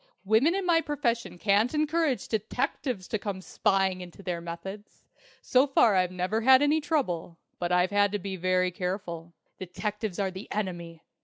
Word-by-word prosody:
Women 230 - +3
in 390 -1 -2
my 335 -2 +4
profession 240 - -2
can't 210 - +2
encourage 305 -2 0
detectives 225 -1 -2
to 220 - -2
come 200 -2 -4
spying 190 +1 0
into 180 +2 -11
their 175 -2 -3
methods. 190 +5 -9 0.4
So 260 +3 +4
far 240 -5 +4
I've 185 -1 +2
never 185 +5 -1
had 260 +3 +6
any 300 +2 +3
trouble. 185 - -2 0.2
But 175 0 -2
I've 180 +1 +3
had 205 0 +3
to - - +1
be 195 0 -5
very 185 0 +1
careful. 175 -2 -5 0.2
Detectives 210 +2 -4
are 195 -2 -1
the 190 +3 -9
Enemy! 170 -5 -4
200 Hz, 165 wpm, -28 LUFS, 180-245 Hz, 0.4 s, had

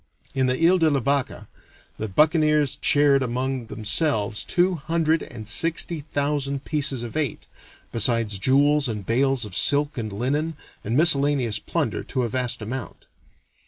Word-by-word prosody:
In 130 -1 +1
the 130 0 0
Ile 185 +1 +3
de 160 -1 +3
la 140 -2 +1
Vache 140 +1 -2 0.5
the 110 - -3
buccaneers 150 - +2
shared 145 -1 +3
among 130 0 -3
themselves 110 -1 0
two 180 +1 +1
hundred 160 0 0
and 115 -7 -9
sixty 165 +4 +2
thousand 140 -1 -2
pieces 140 -5 0
of 120 - -8
eight, 150 -7 -3 0.5
besides 115 -2 +1
jewels 140 +5 +3
and 105 -3 -5
bales 130 +1 +1
of 100 -3 -8
silk 145 -1 +2
and 110 -2 -5
linen 145 +10 -2 0.3
and 115 +5 -1
miscellaneous 140 -8 +2
plunder 150 -10 -3
to 130 - -2
a 120 - -2
vast 125 -2 -2
amount. 120 +1 -7
135 Hz, 150 wpm, -23 LUFS, 115-150 Hz, 0.5 s, Ile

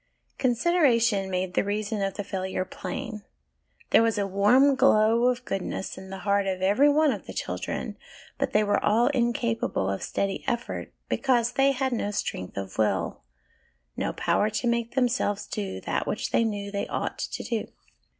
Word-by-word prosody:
Consideration 240 - +3
made 185 -1 -2
the - - +2
reason 210 +1 -2
of 195 -1 -1
the 205 - -3
failure 190 -1 -3
plain: 215 +3 -6 0.7
there - - +7
was 225 -1 +2
a 200 - +1
warm 210 +9 +4
glow 230 -1 +4
of 250 0 0
goodness 195 0 -3
at 190 0 -10
the 195 - -6
heart 200 -1 +2
of 190 -1 -1
every 210 +10 +5
one 300 0 +4
of - - -6
the - - -7
children, - - -4 0.4
but - - 0
they 210 - +3
were 205 -1 +1
all 225 +5 +3
incapable 235 - 0
of 95 - -3
steady 195 -1 -2
effort, 240 -2 -3 0.2
because 245 -3 +2
they 270 +2 +3
had 265 -1 -1
no 215 -3 -1
strength 95 - -4
of 100 +1 -5
will, 95 -6 0 0.7
no - - -1
power 210 - +1
to 215 +3 -3
make 235 0 0
themselves 245 -5 +1
do 200 -3 -4
that - - -2
which - - -2
they - - +3
knew 205 -2 -3
they 200 0 -2
ought - - -3
to - - -4
do. 230 -3 -2
215 Hz, 175 wpm, -26 LUFS, 195-240 Hz, 0.7 s, there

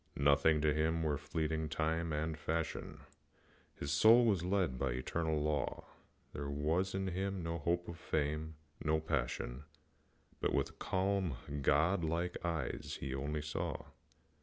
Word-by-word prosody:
Nothing 70 +2 +4
to 75 -1 +3
him 80 +2 +1
were 75 -3 0
fleeting 80 +1 -1
time 80 +1 0
and 75 +1 -1
fashion, 80 0 -3 0.7
His 70 - -4
soul 115 +11 +7
was 100 -7 +2
led 90 -9 +1
by 65 -2 0
the - - -3
eternal 80 +4 -1
law; 75 0 -1 0.5
There 70 0 -4
was 80 +7 0
in 95 0 -1
him 95 0 -2
no 85 0 -2
hope 85 +3 0
of 85 0 -7
fame, 75 +1 -1 0.3
no 80 0 +2
passion, 65 -3 -2 0.8
But, - - +1
with - - -1
calm, 95 -4 0 0.3
god 80 +7 +3
like 85 +2 -1
eyes, 85 -2 -2
he 65 -1 -3
only 75 +3 -2
saw. 75 - -3
80 Hz, 145 wpm, -35 LUFS, 75-85 Hz, 0.8 s, soul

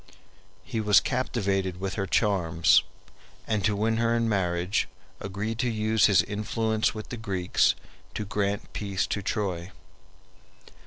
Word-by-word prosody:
He 110 - -3
was 105 -1 +6
captivated 100 -8 -1
with 95 0 -3
her 95 -2 -2
charms, 85 -7 +3 0.6
and 105 -3 -1
to 105 0 +2
win 110 +2 +1
her 115 0 +2
in 115 0 +1
marriage 90 -2 0 0.3
agreed 100 +4 -4
to 125 - +1
use 110 -1 +3
his 100 -4 +5
influence 110 +1 -1
with 110 - -7
the 120 - -5
Greeks 95 -5 +1 0.4
to 105 - -3
grant 100 0 -2
peace 100 -2 -1
to 100 - -3
Troy. 95 -4 -2
105 Hz, 140 wpm, -27 LUFS, 95-110 Hz, 0.6 s, was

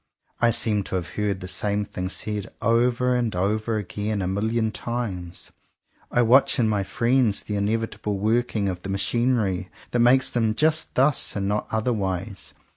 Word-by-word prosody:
I 120 - +4
seem 105 -2 +2
to - - -3
have 90 -2 -3
heard 100 -2 -2
the 90 - -6
same 105 +2 -1
thing 90 -1 -5
said 105 +1 -2
over 120 +2 +2
and 120 -5 -1
over 110 +4 0
again 105 0 -3
a - - -1
million 110 +3 0
times. 100 -8 -5 0.6
I 120 - +2
watch 125 +4 +4
in 120 -4 +2
my 105 -2 +1
friends 120 0 +1
the 105 - -4
inevitable 105 0 -1
working 110 0 0
of 90 -2 -3
the 95 - -6
machinery 100 -1 0 0.2
that 120 - 0
makes 125 +2 +5
theipi 110 -3 +1
just 155 +3 +1
thus 135 +2 +3
and 100 -1 -1
not 105 +1 -1
otherwise. 105 -4 -2
110 Hz, 165 wpm, -24 LUFS, 100-120 Hz, 0.6 s, makes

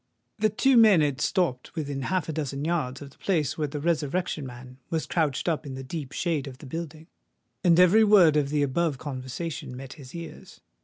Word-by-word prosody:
The 215 0 +3
two 260 +5 +3
men 215 -7 +7
had 145 -3 0
stopped 160 -10 -1
within 145 -4 -3
half 180 +3 -1
a 160 - -3
dozen 145 -2 -3
yards 145 -5 -2
of 140 - -11
the - - -24
place 160 -8 0
where 150 -2 -1
the 145 +1 -5
Resurrection 155 -1 -1
Man 125 +1 -11
was 160 -1 -1
crouched 155 -4 -1
up 160 -3 0
in 135 -3 -7
the 135 - -6
deep 140 0 -6
shade 155 -4 -1
of 130 -2 -9
the - - -12
building; 160 +1 -6 0.6
and 175 -1 +5
every 185 +5 +6
word 195 -8 +6
of 145 -2 +2
the 145 0 +1
above 145 +1 0
conversation 130 0 -6
met 135 0 -8
his 140 -1 -12
ears. 170 -1 -9
150 Hz, 205 wpm, -26 LUFS, 135-170 Hz, 0.6 s, men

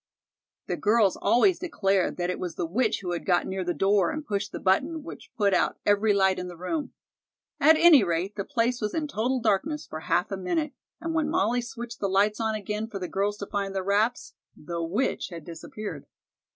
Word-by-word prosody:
The - - -3
girls 210 -2 +3
always 350 +10 +3
declared 195 - 0
that 175 0 -1
it - - -5
was 180 -3 -4
the - - -2
witch 215 +8 0
who 180 - -3
had 175 - -3
got 175 -2 +2
near 190 0 -3
the 180 - -1
door 200 +4 +3
and 310 -1 -4
pushed 200 -3 -2
the - - -5
button 285 - +1
which 330 - -10
put 200 -3 +3
out 180 - +1
every 205 +1 +3
light 190 -2 +3
in 180 - -4
the 175 -1 -9
room. 285 - -3 0.7
At 315 +3 +7
any 320 -8 +7
rate, 175 +3 -1
the 200 - -2
place 240 +1 0
was 210 -1 -2
in 315 -2 -1
total 255 0 -1
darkness 240 +8 0
for 155 - -7
half 175 +4 0
a 195 - -2
minute, 300 - -1 0.3
and 330 -1 -3
when 315 -2 +1
Molly 245 -3 +1
switched 235 0 -8
the 200 - -1
lights 205 +3 +2
on 220 -1 0
again 210 +1 -3
for 215 - -6
the 185 -2 -4
girls 205 +3 -1
to 200 - -5
find 200 -1 -3
their 190 - -1
wraps 200 - 0 0.2
the 170 +2 -5
witch 185 +11 -1
had 165 -4 -9
disappeared. 175 +5 -7
205 Hz, 215 wpm, -27 LUFS, 190-245 Hz, 0.7 s, At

